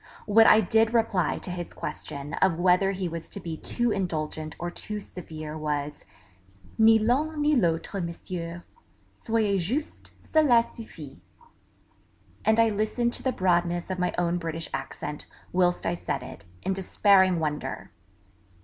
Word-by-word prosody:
What 225 +2 +6
I 220 - +7
did 225 +3 +2
reply 200 -7 +1
to 180 - -6
his 175 -1 -5
question 140 +1 -6
of 185 -4 +3
whether 180 +2 +4
he 190 -2 -2
was 165 -1 -6
to - - -7
be 165 -2 -5
too 240 +8 -1
indulgent 155 -5 -3
or 175 0 -4
too 210 +4 -5
severe 155 -6 -8
was 150 -1 -3 0.7
'Ni 225 0 +7
l'un 280 +8 +1
ni 295 0 +3
l'autre, 180 -2 0
Monsieur; 170 0 -5 0.5
soyez 210 - 0
juste, 255 - -3
celà 275 -7 +4
suffit'... 155 - -11 1.2
and 220 +1 +3
I 230 0 +5
listened 215 +3 0
to - - -1
the 260 - 0
broadness 175 -3 +1
of 185 - -3
my 180 0 +1
own 175 0 +1
British 165 -1 -5
accent, 150 0 -5 0.3
whilst 180 -1 +2
I 170 - +1
said 170 - -3
it, 125 -5 -10 0.2
in 190 - 0
despairing 190 -1 +3
wonder! 150 -2 -3
180 Hz, 150 wpm, -27 LUFS, 165-220 Hz, 1.2 s, I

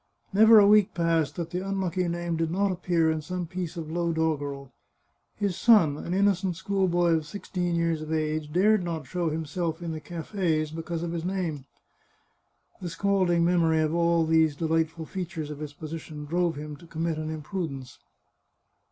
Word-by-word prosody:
Never 220 +2 +8
a 205 - +8
week 210 -1 +5
passed 165 -4 +1
that 170 -1 -4
the 180 - -2
unlucky 190 -2 -1
name 170 0 -2
did 165 0 -1
not 195 +3 +1
appear 170 -3 +1
in 160 -1 -2
some 180 +2 -4
piece 175 0 -5
of 160 -2 -5
low 170 0 0
dog 160 -2 +1
gerel. 140 -2 -6 0.6
His 200 -3 -1
son, 200 -12 +5
an 160 - -6
innocent 190 -1 +2
schoolboy 185 -2 +1
of 160 -2 +1
sixteen 180 -2 -3
years 165 -2 0
of 155 0 -6
age, 155 -1 -1
dared 200 +4 +3
not 165 -4 -4
show 170 +4 -1
himself 160 +1 -3
in 170 -1 -4
the 160 - -4
cafes 165 -2 -2
because 165 +1 -4
of 170 - -3
his 170 -1 -3
name. 175 -7 -3 1.2
The 175 - -4
scalding 180 -2 +2
memory 165 -2 +3
of 155 0 0
all 170 -1 +3
these 160 -2 +3
delightful 160 +1 -1
features 165 -4 -5
of 145 - -7
his 150 -1 -6
position 155 -1 -7
drove 170 +2 0
him 150 0 -7
to 170 - -16
commit 165 0 -2
an 155 0 -4
imprudence. 155 -5 -5
165 Hz, 180 wpm, -27 LUFS, 155-180 Hz, 1.2 s, Never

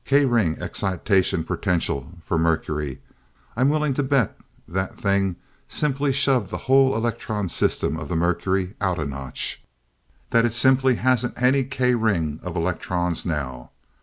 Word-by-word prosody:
"K 140 +1 +4
ring 115 -11 +2
excitation 95 -2 0
potential 85 -5 -1
for - - -1
mercury. 75 -4 -1 0.5
I'm 130 +4 +3
willing 150 -1 +1
to 145 - 0
bet 135 -5 +1 0.3
that 95 +2 -3
thing 100 -2 +1 0.3
simply 140 -1 0
shoved 130 -6 +2
the - - -4
whole 135 0 +5
electron 110 -3 -2
system 80 - 0
of 80 - -7
the 90 - -1
mercury 90 +3 0
out 95 -3 +1
a 75 - -2
notch 70 -2 -3 0.7
that 115 -2 +4
it 120 -1 +1
simply 130 +1 +4
hasn't 125 0 0
any 130 +2 +3
K 125 -1 +1
ring 85 -10 0
of 90 -2 -6
electrons 90 0 -1
now. 65 -6 -4
100 Hz, 145 wpm, -23 LUFS, 85-130 Hz, 0.7 s, whole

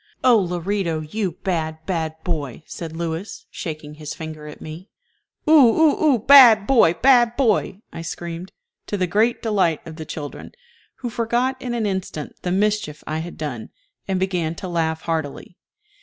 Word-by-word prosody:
"Oh, 245 -3 +6
Lorito, 180 -2 -1
you 185 +4 -3
bad, 160 -4 -1
bad 160 -4 -2
boy!" 150 -5 -4
said 165 -2 -7
Louis, 170 +4 -5
shaking 155 -2 -6
his 150 0 -7
finger 155 -1 -8
at 150 - -10
me. 160 +6 -9 0.6
"Oo - - +4
oo 300 +3 +5
oo, 290 -5 +5
bad 230 -3 +8
boy! 220 -9 +4
bad 240 +2 +4
boy!" 215 -6 +1
I - - -6
screamed, 170 +2 -6 0.4
to 205 - -2
the 185 - +1
great 215 +7 +1
delight 190 -8 +1
of 160 -1 -9
the 160 - -6
children, 145 -2 -7 0.5
who 240 -2 -3
forgot 240 +3 -1
in 245 -2 -3
an 225 -2 -1
instant 190 -6 -4
the 180 - -2
mischief 205 -5 0
I 155 +1 -3
had 170 +2 -7
done, 135 -8 -5 0.4
and 190 -1 0
began 180 -4 -1
to 185 - -6
laugh 160 -2 -1
heartily. 160 +1 -4
180 Hz, 165 wpm, -22 LUFS, 160-220 Hz, 0.6 s, bad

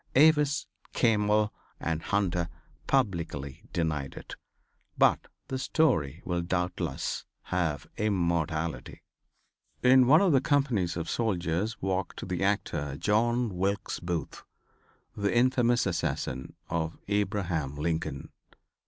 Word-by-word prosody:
Avis, 150 0 +5 0.3
Campbell 105 -2 +2 0.3
and 80 -1 -2
Hunter 90 -3 0 0.4
publicly 85 - -1
denied 75 -5 -2
it. - - -9 0.6
But - - +3 0.2
the 130 - -3
story 95 - +1
will 90 -1 0
doubtless 90 0 -2 0.3
have 80 -5 0
immortality. 85 -7 -1 0.8
In 125 0 +7
one 155 +5 +7
of 195 -3 +4
the 135 -3 +4
companies 125 - +1
of 85 -1 -3
soldiers 100 0 -1
walked 95 -1 -2
the 90 0 -2
actor 75 -8 -1
John 115 - +1
Wilkes 100 +2 -1
Booth, 85 -4 -4 0.7
the 100 +3 0
infamous 120 -1 +3
assassin 75 -7 -2
of 80 0 -2
Abraham 95 -8 -1
Lincoln. 80 -2 -2
95 Hz, 105 wpm, -29 LUFS, 85-115 Hz, 0.8 s, In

